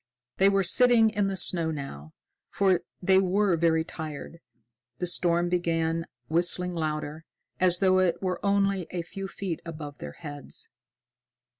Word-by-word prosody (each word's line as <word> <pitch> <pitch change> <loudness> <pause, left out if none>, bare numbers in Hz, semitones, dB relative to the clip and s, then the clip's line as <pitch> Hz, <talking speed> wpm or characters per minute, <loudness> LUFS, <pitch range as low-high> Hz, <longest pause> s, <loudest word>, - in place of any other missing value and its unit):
They 195 +1 +5
were 195 -1 +2
sitting 235 +2 +5
in 205 -2 0
the 195 -1 -2
snow 170 -2 +2
now, 80 - -7 0.4
for 190 -3 +2 0.2
they 190 +1 +5
were 190 0 +2
very 160 -1 +2
tired. 160 0 -8 0.6
The 180 - -2
storm 175 0 +1
began 165 -2 0 0.2
whistling 175 +3 +2
louder, 155 -1 -3 0.4
as 180 -1 +4
though 185 0 +3
it 185 -2 +2
were 185 -2 -3
only 200 -3 +1
a 175 -2 -4
few 195 +3 -7
feet 190 -4 -5
above 155 -4 -8
their 75 0 -7
heads. 145 - -6
175 Hz, 145 wpm, -27 LUFS, 160-190 Hz, 0.6 s, They